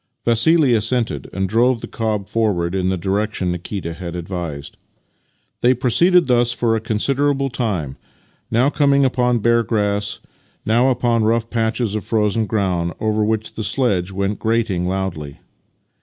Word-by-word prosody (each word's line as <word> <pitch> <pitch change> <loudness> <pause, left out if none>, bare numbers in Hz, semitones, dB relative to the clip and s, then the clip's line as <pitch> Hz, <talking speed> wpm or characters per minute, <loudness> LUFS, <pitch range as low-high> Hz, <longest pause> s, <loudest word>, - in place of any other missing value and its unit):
Vassili 130 +4 +4
assented, 115 +1 -1
and 95 0 -2
drove 120 +4 +2
the - - -7
cob 105 -3 -3
forward 95 -7 0
in 95 -1 0
the 95 - 0
direction 100 0 -1
Nikita 90 0 -5
had 85 0 -7
advised. 85 -5 -6 0.9
They 125 +1 +4
proceeded 170 +9 +3
thus 120 -1 +2
for 115 -2 0
a - - 0
considerable 135 +5 0
time, 100 - -2 0.5
now 125 +5 +2
coming 140 -2 +3
upon 125 -2 +1
bare 115 0 +4
grass, 105 -1 -1 0.5
now 120 +4 +3
upon 120 -2 +1
rough 115 +1 0
patches 115 -1 -1
of 110 -2 -3
frozen 110 0 0
ground, 90 -5 -1
over 110 0 0
which 110 0 -2
the 110 - -5
sledge 100 -6 0
went 100 +2 -2
grating 110 -6 0
loudly. 90 -7 -4
110 Hz, 145 wpm, -19 LUFS, 95-120 Hz, 0.9 s, Vassili